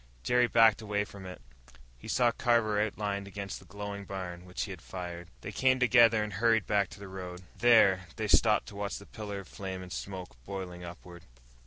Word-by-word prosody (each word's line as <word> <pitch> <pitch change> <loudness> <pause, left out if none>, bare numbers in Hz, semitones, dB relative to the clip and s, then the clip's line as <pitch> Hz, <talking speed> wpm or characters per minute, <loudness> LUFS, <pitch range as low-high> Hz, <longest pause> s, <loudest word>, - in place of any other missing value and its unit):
Jerry 125 0 +3
backed 115 -2 +5
away 105 -1 -1
from 100 -2 -10
it. 90 -9 -10 0.6
He - - -11
saw 120 -2 +3
Carver 115 -4 +2
outlined 100 -2 -2
against 100 -1 -6
the - - -17
glowing 100 +1 -6
barn, 90 -2 -6
which 90 0 -4
he 100 - -5
had 90 -4 -8
fired. 85 -1 -7
They 100 - -6
came 130 +3 +3
together 120 -3 +5
and 105 -1 -5
hurried 110 +1 +3
back 100 -2 +1
to - - -12
the 100 - -8
road. 90 -1 -7 0.2
There 105 -6 +5
they 110 - -2
stopped 105 +1 +4
to 100 - -12
watch 100 0 -3
the 100 - -11
pillar 105 -2 -6
of 95 - -15
flame 95 -1 -6
and 90 - -8
smoke, 90 -11 -7
boiling 90 +2 -6
upward. 85 0 -10
100 Hz, 200 wpm, -30 LUFS, 90-110 Hz, 0.6 s, backed